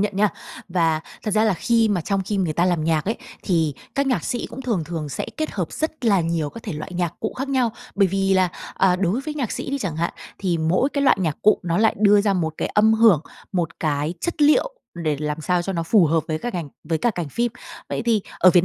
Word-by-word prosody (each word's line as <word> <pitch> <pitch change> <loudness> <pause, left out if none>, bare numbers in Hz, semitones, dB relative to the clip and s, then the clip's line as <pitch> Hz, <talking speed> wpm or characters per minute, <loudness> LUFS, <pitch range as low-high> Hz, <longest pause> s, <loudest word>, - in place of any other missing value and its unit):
nhận 205 -1 -1
nha. 210 +1 +4 0.4
Và 165 -3 +1 0.2
thật 215 - -2
ra 215 +2 +3
là 215 -4 +3
khi 230 +3 +2
mà 200 -4 +1
trong 195 +3 -1
khi 205 +1 -2
người 175 -5 0
ta 170 +3 +2
làm 175 -4 +1
nhạc 160 -2 +1
ấy, 220 +4 -1 0.3
thì 160 -6 +1 0.2
các 280 0 +1
nhạc 255 - 0
sĩ 245 - -2
cũng 245 +3 -8
thường 215 -10 -1
thường 160 -2 -4
sẽ - - -4
kết 310 -1 -2
hợp 180 -5 -3
rất 315 -4 -3
là 200 -5 +4
nhiều 165 -3 -1
các 230 - -10
thể 205 - -5
loại 155 +4 -6
nhạc 175 -1 -1
cụ - - -2
khác 270 +1 -2
nhau. 255 -5 +1 0.2
Bởi 195 -1 +4
vì 195 +1 +1
là, 185 -1 +4 0.3
à, 180 -2 +3
đối 195 +6 0
với 300 +1 -5
nhạc 260 -7 -2
sĩ - - -4
đi 280 - -1
chẳng 175 - -3
hạn, 170 +1 -1 0.3
thì 175 -4 0
mỗi 175 - +2
cái 280 - 0
loại 275 - +5
nhạc 160 -5 -2
cụ 215 - +5
nó 170 +1 0
lại 220 0 +4
đưa 205 -1 +6
ra 200 -1 +2
một 160 -4 -1
cái - - -2
âm 220 +1 +4
hưởng, 220 -9 +6 0.3
một 170 -3 -2
cái 150 +1 0
chất 340 -3 -1
liệu 305 +12 +4 0.2
để 155 -4 -1
làm 150 +1 -2
sao 180 +2 +1
cho 195 - -3
nó 165 -2 -1
phù 175 0 +4
hợp 160 0 +2
với 155 0 -1
cả 245 - -3
ngành 170 -5 -4 0.2
với 160 -2 -1
cả 240 - +2
cảnh 175 -7 -4
phim. 235 +7 -1 0.4
Vậy - - -2
thì 230 -3 +2 0.2
ở 185 - +7
Việt 175 0 +4
185 Hz, 265 wpm, -22 LUFS, 165-225 Hz, 0.4 s, ở